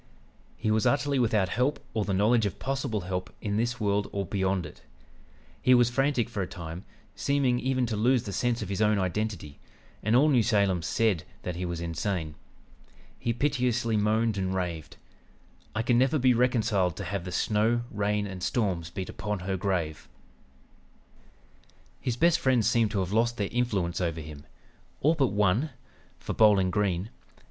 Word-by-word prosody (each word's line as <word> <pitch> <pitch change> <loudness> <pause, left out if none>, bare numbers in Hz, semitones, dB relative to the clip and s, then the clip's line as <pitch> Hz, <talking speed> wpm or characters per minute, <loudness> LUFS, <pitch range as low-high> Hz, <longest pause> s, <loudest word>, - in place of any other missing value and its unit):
He 110 -1 0
was 110 -1 +2
utterly 140 -1 +1
without 105 -6 +2
help 125 +8 0
or 110 -2 0
the 100 - -2
knowledge 105 +3 +3
of 95 - -6
possible 135 -6 -2
help 90 0 -4
in 100 -1 -2
this 120 +2 -1
world 100 -1 0
or 100 -1 -2
beyond 95 -1 -1
it. 75 - -12 0.8
He 125 - +5
was 120 -1 +4
frantic 135 -2 +1
for 110 -4 -4
a 90 - -2
time, 85 +1 -8 0.3
seeming 135 -3 +1
even 130 0 0
to 115 -2 -2
lose 120 +3 +2
the 100 - -6
sense 120 +4 0
of - - -7
his 100 +1 -2
own 105 -1 +3
identity, 95 -5 -3 0.4
and 110 +3 +1
all 140 +5 +5
New 130 -5 +4
Salem 100 -5 +2
said 95 0 +1 0.2
that 90 - -4
he 90 +1 -3
was 85 -1 -4
insane. 85 -1 -3 0.9
He 120 - -1
piteously 125 -3 0
moaned 110 0 +1
and 95 0 -1
raved: 85 -4 -4 0.8
"'I 110 - 0
never 130 +5 +3
can - - -2
be 130 0 +5
reconciled 110 -7 +1
to - - -5
have 95 0 -3
the 90 - -6
snow, 110 +5 +1
rain, 105 0 0
and 95 -2 -7
storms 90 -7 -1
beat 95 +2 -5
upon 105 -3 -4
her 95 +1 -2
grave.' 90 -5 -2 1.9
"His 120 - -2
best 170 +4 +4
friends 130 -4 +2
seemed 115 -2 +3
to 100 -2 -1
have 95 0 -3
lost 115 +2 +2
their 100 -2 -1
influence 100 -8 -1
over 85 -2 -1
him,... 75 -1 -10 0.5
all 155 +4 +3
but 140 -5 +2
one; 105 +7 +1 0.5
for - - -5
Bowling 100 -4 +4
Green 100 0 -1
105 Hz, 175 wpm, -28 LUFS, 95-120 Hz, 1.9 s, He